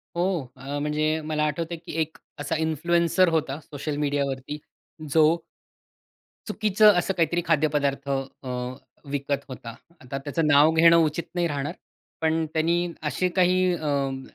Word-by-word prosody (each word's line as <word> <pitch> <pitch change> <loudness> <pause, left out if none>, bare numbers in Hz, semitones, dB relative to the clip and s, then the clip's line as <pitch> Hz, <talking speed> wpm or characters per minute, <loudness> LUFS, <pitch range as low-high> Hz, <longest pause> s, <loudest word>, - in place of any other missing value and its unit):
हो, 170 -7 -1
अ, 135 +2 -5
म्हणजे 155 +1 0
मला 155 -1 -1
आठवतंय, 165 +3 -3
की 165 - -10
एक 160 +1 -3 0.2
असा 145 +3 -2
इन्फ्लुएन्सर 170 +3 +2
होता 155 -3 -1
सोशल 145 0 -5
मीडियावरती. 140 -1 -2 0.5
जो 160 +2 +4 1.1
चुकीचं 210 0 +4
असं 190 +2 -1
काहीतरी 170 0 +1
खाद्यपदार्थ 145 -3 +1
अ, 135 -1 -4 0.6
विकत 140 0 -2
होता. 120 -3 -8 0.3
आता 130 +1 -5
त्याचं 145 +3 -1
नाव 145 +2 +6
घेणं 165 +1 +6
उचित 160 0 +1
नाही 175 -1 +1
राहणार. 145 -2 -3 0.5
पण 160 0 +1
त्यांनी 170 +2 +1 0.2
असे 185 +4 0
काही 185 0 +3
अं, 140 -4 -1
155 Hz, 135 wpm, -25 LUFS, 140-170 Hz, 1.1 s, नाव